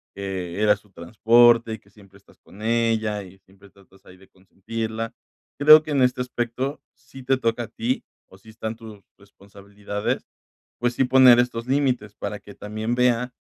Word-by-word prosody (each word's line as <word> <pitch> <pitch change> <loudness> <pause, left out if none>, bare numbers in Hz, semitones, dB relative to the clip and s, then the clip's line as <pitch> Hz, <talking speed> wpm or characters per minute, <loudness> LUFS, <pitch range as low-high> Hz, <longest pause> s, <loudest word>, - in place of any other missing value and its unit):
que 95 -1 -5
eras 105 -1 +3
su 105 -2 -27
transporte, 115 +5 +3
y 110 - -7
que 100 - -27
siempre 100 -2 -19
estás 100 - -25
con 100 - -17
ella, 110 -2 0
y 95 +1 -15
siempre 95 +1 -21
tratas 95 0 -24
ahí 90 - -16
de 95 - -20
consentirla. 110 +4 -6 0.5
Creo 155 +1 +8
que 155 - -7
en 140 - +1
este 125 0 +2
aspecto 125 +3 -4
sí 130 0 -14
te 135 +1 +1
toca 115 -1 -1
a - - -8
ti, 235 +1 -3 0.3
o, 95 - -17
sí 110 +3 -18
están 110 0 -6
tu 110 -3 -13
responsabilidades, 100 +1 -6 0.5
pues 120 0 0
sí 135 - +1
poner 125 -1 +6
estos 120 -1 -3
límites 130 -6 -1
para 105 - -6
que 100 - -14
también 110 +3 -4
vea 125 0 +1
110 Hz, 180 wpm, -23 LUFS, 100-125 Hz, 0.5 s, Creo